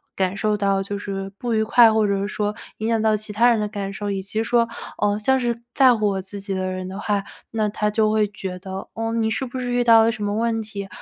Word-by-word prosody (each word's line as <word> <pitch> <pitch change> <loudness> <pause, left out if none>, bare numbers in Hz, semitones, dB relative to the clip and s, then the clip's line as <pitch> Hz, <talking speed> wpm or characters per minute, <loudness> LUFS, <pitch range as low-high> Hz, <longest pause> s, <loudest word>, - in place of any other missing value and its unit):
感 190 +1 0
受 210 0 +1
到 195 -1 +1
就 200 +1 -4
是 195 -1 -4
不 240 -2 -2
愉 220 - +2
快， 230 +1 +6
或 220 -1 +2
者 200 -1 0
是 200 - -1
说 210 0 -2 0.2
影 220 - -3
响 225 -1 +1
到 215 -1 +3
其 210 0 -7
他 235 +3 +5
人 230 - +2
的 210 - -1
感 200 -2 -4
受。 205 +1 -4
以 195 -1 -2
及 205 +3 -3
说， 235 0 +2 0.3
呃， 205 0 +2
像 265 +5 +2
是 235 -1 -2
在 260 -3 +6
乎 215 -2 +1
我 195 -1 -1
自 200 +2 -9
己 195 0 -5
的 185 0 -2
人 185 0 -4
的 190 - -7
话， 205 -1 0 0.3
那 215 -2 0
他 210 0 -1
就 215 0 +2
会 215 -1 +3
觉 190 -2 -6
得， 190 +1 -7
哦， 225 0 -2
你 225 -1 +1
是 260 +5 -1
不 255 +1 -6
是 245 -1 -2
遇 245 0 +2
到 225 -1 +7
了 230 - +3
什 215 -3 -5
么 205 0 -1
问 225 0 0
题？ 200 -2 -7
210 Hz, 295 characters per minute, -22 LUFS, 200-225 Hz, 0.3 s, 到